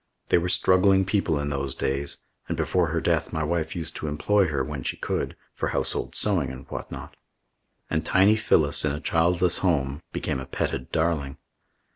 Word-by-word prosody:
They - - +5
were 90 +1 -2
struggling 95 +1 +4
people 95 -6 0
in 70 0 -2
those 70 -2 -2
days, 70 +1 -2 0.3
and - - -3
before 90 -2 +1
her 80 +2 -1
death 80 -1 0
my 80 -2 -2
wife 80 0 -2
used 80 -2 -3
to 75 - -4
employ 95 +7 +2
her, 70 -4 -1
when 75 0 -5
she - - -3
could, - - -3 0.2
for - - -2
household - - -1
sewing 90 -10 +2
and 65 +1 -9
whatnot. - - -7 0.7
And 80 - -1
tiny 100 +3 +4
Phyllis, 80 -9 +4
in 75 -2 +1
a 75 - -4
childless 85 +2 +2
home, 75 -5 0
became 65 - -2
a 65 - -7
petted 65 - -3
darling. 80 -4 -1
80 Hz, 180 wpm, -25 LUFS, 70-90 Hz, 0.7 s, They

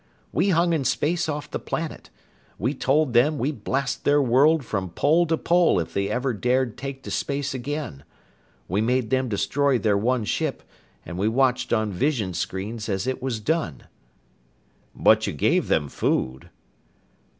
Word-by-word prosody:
We 200 - +1
hung 170 -1 +3
in 155 -4 0
space 160 +6 0
off 150 -1 -4
the - - -3
planet. 165 -1 -5 0.5
We 125 +8 -1
told 145 -2 +1
them 140 +6 +4
we'd 135 -4 -3
blast 135 +1 -1
their 145 +1 +4
world 140 +3 +4
from 95 -5 -3
pole 160 - +2
to 160 0 +1
pole 175 - +3
if 80 - -4
they 100 0 -1
ever 125 0 -1
dared 125 +1 0
take 135 0 -7
to - - -7
space 140 0 -2
again. 130 - -5 0.6
We 95 +4 0
made 125 0 0
them 130 -1 +1
destroy 130 +7 +1
their 110 -3 +1
one 120 +1 0
ship, - - -2 0.4
and 85 +2 -6
we 100 - +1
watched 125 +2 +1
on 110 -3 +1
visionscreens 105 - -2
as 95 +1 -1
it 130 0 -2
was 125 -4 -2
done." 110 - -2 1.1
"But - - +4
you - - -2
gave - - +1
them 75 -2 +1
food?" 65 -1 -2
130 Hz, 160 wpm, -24 LUFS, 105-145 Hz, 1.1 s, them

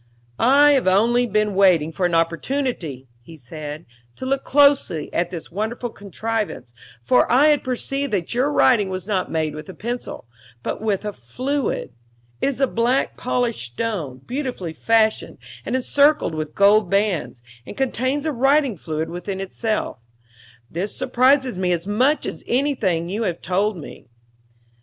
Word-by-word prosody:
"I 285 +4 +6
have 270 -8 +2
only 235 +6 +3
been 215 -1 +1
waiting 180 -5 +4
for 180 +2 0
an 170 - -1
opportunity," 165 - -1
he 160 +7 -13
said, 150 +3 -8 0.3
"to - - -7
look 270 +1 0
closely 280 - +3
at 175 0 0
this 170 -3 -8
wonderful 220 +5 -3
contrivance, 205 - -4 0.3
for 125 - +3
I 280 +5 +6
had 295 -1 +2
perceived 275 +2 -2
that 185 -1 -1
your 260 +5 +1
writing 225 -8 +3
was 185 -1 -4
not 195 -3 -1
made 155 -2 -1
with 155 +2 -9
a 190 - -9
pencil, 240 - -5 0.4
but - - -4
with 210 -2 -1
a 210 - -3
fluid. 250 - -3 0.5
It - - +2
is 275 -1 -1
black 240 +4 +1
polished 235 - -2
stone, 155 - -3
beautifully 250 - -4
fashioned 220 +3 +1 0.3
and - - -1
encircled 285 - +3
with 155 -1 -5
gold 200 -1 +4
bands, 195 - 0 0.2
and - - -9
contains 265 +1 -1
the 315 - -1
writing 270 -3 +2
fluid 160 0 -3
within 190 +2 -5
itself. 210 - -3 0.7
This 180 - -4
surprises 255 -3 +2
me 180 -1 +1
as 170 0 -3
much 250 +9 +1
as - - -6
anything 235 - 0
you 200 +5 -3
have 175 -7 -1
told 195 +3 0
me." 150 - -11
210 Hz, 155 wpm, -22 LUFS, 170-255 Hz, 0.7 s, I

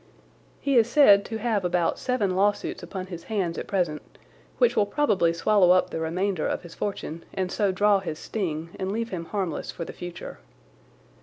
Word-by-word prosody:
He 275 -2 +1
is 230 0 +4
said 210 -8 +6
to 225 - -4
have 220 -3 0
about 175 -1 0
seven 210 -8 0
lawsuits 200 +2 0
upon 190 -2 -6
his 175 -2 -9
hands 190 -6 -1
at - - -6
present, 175 -6 -1 0.6
which - - +3
will 205 - +3
probably 205 - +2
swallow 185 +2 +3
up 185 - +2
the - - -3
remainder 175 +2 -1
of - - -2
his 175 - -11
fortune 170 -5 -4
and 185 -1 -2
so 205 -2 +1
draw 205 +1 +3
his 165 -5 -5
sting 165 -5 -4
and 190 0 -2
leave 230 +2 -2
him 170 -3 -5
harmless 185 -3 -3
for 170 - -5
the - - -8
future. 175 -1 -8
190 Hz, 185 wpm, -26 LUFS, 170-210 Hz, 0.6 s, said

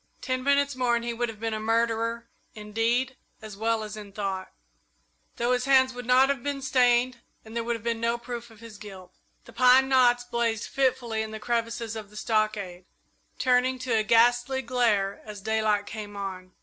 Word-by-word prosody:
Ten 255 -1 -2
minutes 280 0 +2
more 250 -2 +1
and 235 0 -2
he 235 - -2
would 240 0 -2
have 220 -2 -9
been 225 0 -2
a 215 - -2
murderer 230 +1 0 0.3
in 210 -1 -10
deed 240 +4 +1 0.2
as 215 -2 -9
well 225 +1 0
as 210 0 -7
in 210 -2 -9
thought, 195 -2 -4 0.8
though 240 +1 0
his 250 0 +1
hands 260 -1 +4
would 245 -1 -8
not 255 +1 +5
have 280 -3 -1
been 280 0 -3
stained 250 -1 +2 0.3
and 220 +1 -11
there 235 - -1
would 235 +1 -1
have 225 - -9
been 230 -1 -2
no 235 +1 +1
proof 240 0 -7
of 225 -1 -17
his 225 -3 -11
guilt. 190 -3 -11 0.3
The - - -14
pine 255 +2 +5
knots 245 -2 +4
blazed 235 -3 -1
fitfully 255 -4 0
in 220 - -4
the 220 0 -7
crevices 230 0 -2
of 215 -2 -7
the 210 - -13
stockade, 210 -5 -1 0.5
turning 255 0 +2
to 255 -1 -3
a 220 - +3
ghastly 245 +4 +3
glare 225 -6 +1
as 210 -1 -9
daylight 215 0 0
came 210 -1 -7
on. 185 -2 -6
230 Hz, 200 wpm, -26 LUFS, 215-250 Hz, 0.8 s, not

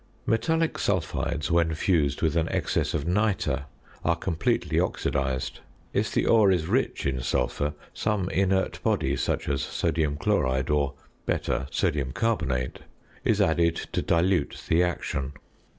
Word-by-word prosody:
Metallic 160 +8 +1
sulphides 85 -5 -1
when 85 -1 +2
fused 75 -4 +1
with 80 -1 +2
an 85 -1 +1
excess - - 0
of 75 -1 -1
nitre 90 -7 +1 0.4
are - - +2
completely 85 -4 0
oxidised. 65 -2 -1 0.3
If - - 0
the - - +1
ore 110 -3 +5
is 90 -4 +2
rich - - 0
in 65 -2 0
sulphur, 65 +4 -1 0.2
some 105 -4 0
inert 95 0 +1
body - - +1
(such - - -1
as 70 -1 0
sodium 75 -3 0
chloride, 65 +1 +1
or, 70 -2 +1 0.3
better, 65 - 0
sodium 75 -5 0
carbonate) 75 - -1 0.4
is - - +2
added 85 +1 +3 0.2
to - - 0
dilute 85 -2 +1
the 80 +2 +4
action. 70 -5 -1
80 Hz, 135 wpm, -26 LUFS, 70-95 Hz, 0.4 s, ore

